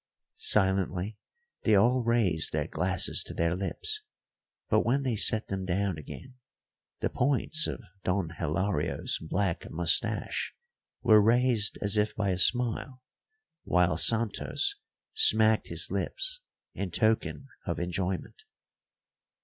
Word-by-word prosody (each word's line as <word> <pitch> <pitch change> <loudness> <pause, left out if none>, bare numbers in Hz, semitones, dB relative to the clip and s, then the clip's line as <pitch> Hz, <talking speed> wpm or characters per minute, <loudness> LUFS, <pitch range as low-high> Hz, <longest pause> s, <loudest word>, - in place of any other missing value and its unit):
Silently 95 0 +1 0.5
they 110 - +2
all 120 +5 +3
raised 110 -9 +2
their - - -2
glasses - - 0
to - - -9
their 85 +1 0
lips, 260 - -3 0.7
but - - +2
when 135 +4 0
they 125 -4 -1
set 110 +1 +3
them 95 -1 -4
down 95 -2 -2
again, 130 - -11 0.7
the - - 0
points 145 +3 +1
of - - -6 0.2
Don 90 -2 -1
Hilario's 85 0 -1
black 90 +2 -3
moustache 85 +1 -1 0.5
were 105 -1 +6
raised 115 -1 +3
as 100 +1 +3
if 105 0 0
by 100 -2 -1
a 90 -1 -1
smile, 125 +4 +1 0.6
while 90 -2 +1
Santos 115 - +2 0.4
smacked 110 - +5
his 85 0 -1
lips 390 - -2 0.3
in 100 - -5
token 110 +7 -1 0.2
of 85 - -2
enjoyment. 90 +1 -4
100 Hz, 120 wpm, -28 LUFS, 90-120 Hz, 0.7 s, were